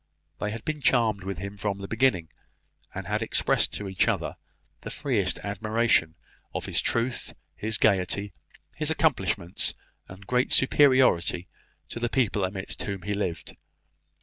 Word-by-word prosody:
They 105 - -2
had 110 +1 -6
been 155 -1 -3
charmed 115 -6 +2
with 95 -1 -4
him 100 +3 -6
from 100 -1 -2
the 100 0 -7
beginning, 110 -9 +1 0.7
and - - -5
had - - -1
expressed - - +2
to 105 - -4
each 95 -1 +1
other - - -1 0.5
the - - -7
freest 110 -10 0
admiration 105 -4 +1 0.4
of - - -3
his - - +1
truth, 120 +1 -1 0.2
his 110 0 +1
gaiety, 100 -1 +1 0.4
his 155 0 0
accomplishments, 95 - 0 0.3
and 95 +2 -12
great 125 +4 +1
superiority 130 -11 +4 0.4
to - - -5
the 120 0 -1
people 115 -6 +1
amidst 95 +1 -3
whom 100 -3 -4
he 105 +2 -2
lived. 90 -5 -3
105 Hz, 150 wpm, -27 LUFS, 95-120 Hz, 0.7 s, superiority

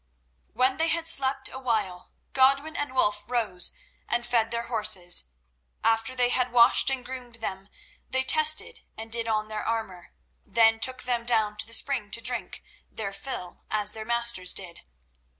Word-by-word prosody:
When 260 +1 +1
they 325 - 0
had 330 0 0
slept 270 -3 +2
awhile, 220 -9 -4 0.2
Godwin 275 +4 +2
and 290 -2 -4
Wulf 210 -4 +1
rose 220 -8 -1 0.4
and 240 0 -1
fed 230 -2 0
their 235 0 -3
horses. 215 - +4 0.6
After 225 +2 0
they 245 -1 +2
had 250 0 0
washed 235 +2 +5
and 265 -2 -3
groomed 250 -2 -9
them, 195 -3 -7 0.4
they 260 0 +1
tested 310 +2 +3 0.2
and 225 0 -8
did 230 0 +2
on 215 -1 -1
their 215 -1 -6
armour, 220 -6 -5 0.3
then 225 +1 +2
took 255 +2 -1
them 245 -2 -2
down 220 -3 +1
to - - 0
the 230 - +2
spring 245 -7 0
to 230 - 0
drink 245 +2 -3 0.3
their 200 -3 -6
fill, 195 -5 -8
as 210 0 +1
their 220 0 -8
masters 235 -5 +1
did. 175 -3 -7
230 Hz, 165 wpm, -25 LUFS, 215-255 Hz, 0.6 s, washed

